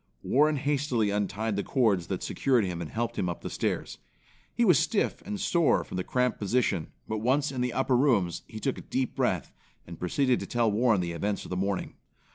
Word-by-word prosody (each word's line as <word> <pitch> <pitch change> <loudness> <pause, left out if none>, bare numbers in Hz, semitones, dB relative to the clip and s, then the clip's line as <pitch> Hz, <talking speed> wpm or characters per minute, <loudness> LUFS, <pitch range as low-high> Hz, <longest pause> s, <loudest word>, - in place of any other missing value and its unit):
Warren 150 +3 +3
hastily 140 -6 0
untied 105 +1 -1
the 100 - -1
cords 105 -10 +1
that - - -3
secured 125 -5 +2
him 90 -2 -4
and 80 - -5
helped 120 +1 -3
him 90 - 0
up 85 - -5
the - - -6
stairs. - - -2 0.5
He 235 - +1
was 180 - +6
stiff 215 - 0
and 210 -1 -3
sore 170 -4 +2
from - - -8
the 90 - -1
cramped 125 +4 0
position, 100 -6 0 0.2
but 110 0 -2
once 135 +6 +1
in 130 -2 -3
the 125 -1 -1
upper 135 0 +1
rooms, 115 - +2
he 110 - -8
took 135 +3 -2
a - - -8
deep 130 -1 -2
breath, - - -1 0.3
and 85 -1 -10
proceeded 125 +8 +1
to - - -6
tell 120 -2 +1
Warren 110 -2 +3
the 85 -1 -2
events 100 +5 -2
of - - -10
the - - -1
morning. 95 +1 -2
115 Hz, 215 wpm, -28 LUFS, 100-135 Hz, 0.5 s, was